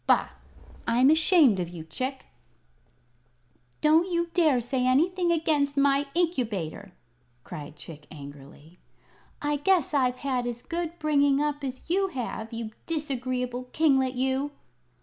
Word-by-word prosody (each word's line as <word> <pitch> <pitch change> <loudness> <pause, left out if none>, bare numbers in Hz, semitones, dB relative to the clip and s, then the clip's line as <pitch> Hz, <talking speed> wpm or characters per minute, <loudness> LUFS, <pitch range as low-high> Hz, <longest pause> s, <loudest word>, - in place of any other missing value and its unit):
Bah! - - +3 0.6
I'm 250 +4 +5
ashamed 315 - +5
of 175 -2 -2
you, 170 -2 -8
Chick!" 255 - -4 1.6
"Don't 320 +4 +4
you 340 -1 0
dare 310 -8 +4
say 250 +1 -1
anything 345 +7 +2
against 300 -4 +1
my 280 0 +3
Incubator!" 215 - -2 0.5
cried 150 0 -8
Chick, 150 0 -8
angrily. 145 +3 -12 0.6
"I 295 0 +1
guess 335 0 +2
I've 255 -3 +2
had 255 -3 -1
as 240 0 -5
good 340 0 -4
bringing 285 -3 +3
up 290 -1 -1
as 260 -1 -6
you 385 +3 +2
have, 235 -7 -5
you 230 -1 -5 0.2
disagreeable 255 -5 -3
kinglet, 265 -5 +3
you!" 265 +2 0
270 Hz, 130 wpm, -27 LUFS, 240-310 Hz, 1.6 s, I'm